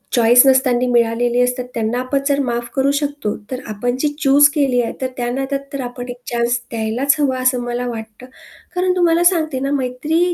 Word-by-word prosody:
Choice 240 +2 +6
नसताना 255 -2 +3
मिळालेली 240 +1 +2
असतात, 250 0 0
त्यांना 230 +2 -1
आपण 255 +2 -1
जर 280 0 +1
माफ 240 -2 -3
करू 270 0 +2
शकतो. 285 -7 -3 0.2
तर 255 - -3
आपण 230 +4 -2
जी 300 - +1
चूज 290 0 +5
केली 270 -4 +2
आहे 230 - -3
तर 260 - 0
त्या 240 -1 -2
नात्यात 270 +2 -2
तर 275 - -3
आपण 245 0 -7
एक 245 - -6
चान्स 240 0 0
द्यायलाच 230 +5 0
हवा 265 -3 0
असं 255 -1 +1
मला 245 +1 -3
वाटतं. 220 0 -8 0.5
कारण 365 0 +1
तुम्हाला 340 -1 +3
सांगते 315 -7 +2
ना, 275 +1 -2
मैत्री 295 +6 0
255 Hz, 190 wpm, -18 LUFS, 240-280 Hz, 0.5 s, Choice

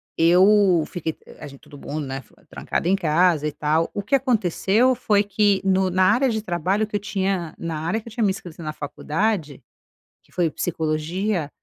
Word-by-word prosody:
eu 180 +1 +5
fiquei 160 -3 -5 0.2
a - - -8
gente 140 -1 -13
todo 150 -1 -14
mundo, 150 +1 -5
né, 135 0 -5
ficou 120 - -26
trancado - - -4
em 190 - +4
casa 165 -3 +2
e - - -2
tal 155 +3 0
o 205 - -1
que 230 - -7
aconteceu 235 - +2
foi 210 -4 +1
que 205 -1 +2
no 190 0 +2
na 185 +1 +2
área 260 +3 +2
de 220 -2 -1
trabalho 185 +2 0
que 210 - -7
eu - - +1
tinha 190 -5 -2
na 165 -2 -4
área 170 +8 -1
que 225 - -16
eu - - -8
tinha 225 +1 -2
me 205 - +3
inscrito 185 -4 -6
na 155 -1 -4
faculdade 155 - -2 0.6
que - - -30
foi 175 -3 0
psicologia, 160 +3 -2
185 Hz, 195 wpm, -22 LUFS, 155-205 Hz, 0.6 s, eu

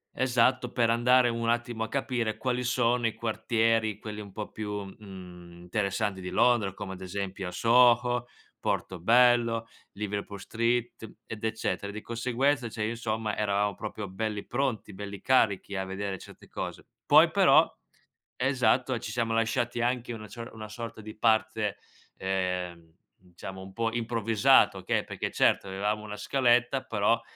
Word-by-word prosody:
esatto, 125 0 +2
per 115 -1 +2
andare 125 +1 +4
un 115 0 -1
attimo 120 -1 -1
a 115 - -2
capire 125 -5 -1
quali 125 -1 -1
sono 120 -1 +2
i 110 - -3
quartieri, 115 -1 +1
quelli 105 0 -7
un 100 -2 -10
po' 105 +1 -6
più, 105 -1 -4
mhmm, 90 -3 -11
interessanti 100 +1 -1
di 90 - -5
Londra, 120 -6 +3
come 95 -1 -6
ad 95 - -10
esempio 95 0 -4
a 90 - -5
Soho, 120 +3 +4 0.3
Portobello, 115 +4 +2 0.3
Liverpool 100 0 -4
street, 115 0 -2
ed 110 -1 -8
eccetera. 105 -3 -2
Di 110 +1 -7
conseguenza, 125 +2 0
cioè, 110 -1 -3
insomma, 110 -2 -2
eravamo 100 -1 +1
proprio 105 -1 -6
belli 105 +2 -3
pronti, 120 -6 -2
belli 100 0 -7
carichi 100 -4 +2
a 95 - -1
vedere 95 0 -4
certe - - -14
cose. - - -6 0.2
Poi - - +6
però, - - +6 0.7
esatto, 130 -1 +2
ci 110 - -6
siamo 115 -1 0
lasciati 120 +1 0
anche 120 0 -1
una 110 -2 -8
cio 115 +4 -8
una 110 -1 -8
sorta 110 0 -7
di 110 +1 -9
parte, 110 -1 +1 0.4
ehm, 90 -3 -3 0.3
diciamo, 95 +2 -9
un 95 0 -10
po' 115 +2 -1
improvvisato, 115 -2 +3
okay, - - -1
perché - - -4
certo - - +2
avevamo 105 +3 -2
una 105 -1 -7
scaletta, 125 +3 +2
però 115 0 +1
110 Hz, 150 wpm, -28 LUFS, 100-120 Hz, 0.7 s, Poi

